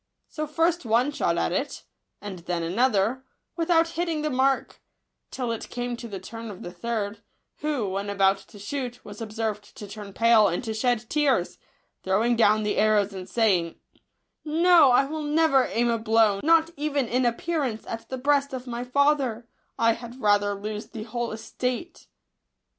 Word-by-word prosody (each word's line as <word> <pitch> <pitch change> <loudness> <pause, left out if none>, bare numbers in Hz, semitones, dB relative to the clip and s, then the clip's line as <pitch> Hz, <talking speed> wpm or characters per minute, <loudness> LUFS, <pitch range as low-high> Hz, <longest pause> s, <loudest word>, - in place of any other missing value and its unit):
So 310 -1 -4
first 330 +3 +1
one 240 +4 +2
shot 295 - 0
at - - 0
it, - - -3 0.4
and 200 -3 -7
then 170 0 -3
another, 225 +5 +1 0.3
without 330 -1 +2
hitting 330 -2 -2
the 305 - -1
mark; 265 +1 0 0.5
till 250 -3 -3
it 230 - -5
came 245 0 -3
to 235 - -7
the 200 -3 -6
turn 225 +4 -8
of 195 -3 -9
the 175 - -6
third, 205 +2 -4 0.4
who, 290 -8 -1
when 195 +2 -3
about 195 -1 +3
to 215 - -15
shoot, 245 +3 -5
was 205 +2 -10
observed 215 -1 -4
to 205 - -8
turn 205 0 -9
pale 225 +1 +5
and 175 +4 -2
to 220 -2 -3
shed 240 0 0
tears, 270 -11 +1 0.4
throwing 215 +6 +2
down 215 -1 +4
the 210 - -1
arrows, 210 -2 +3
and 185 0 -8
saying, 190 -8 +1 0.4
" - - -53 0.2
No, 345 -6 +7
I 250 +2 +5
will 310 +2 -4
never 300 -3 +3
aim 235 +1 +1
a 230 - 0
blow, 220 -2 +3
not 330 +1 +4
even 285 -3 -1
in 250 +3 +1
appearance* 250 -1 -1
at 225 0 -7
the 260 - -4
breast 280 +1 +1
of 255 -1 -5
my 240 -1 -4
father; 260 -3 +1 0.3
I 230 0 +4
had 240 +2 -10
rather 205 -2 +2
lose 210 +1 -5
the 220 - -7
whole 240 +1 -3
estate." 250 +8 -4
235 Hz, 175 wpm, -25 LUFS, 210-275 Hz, 0.5 s, No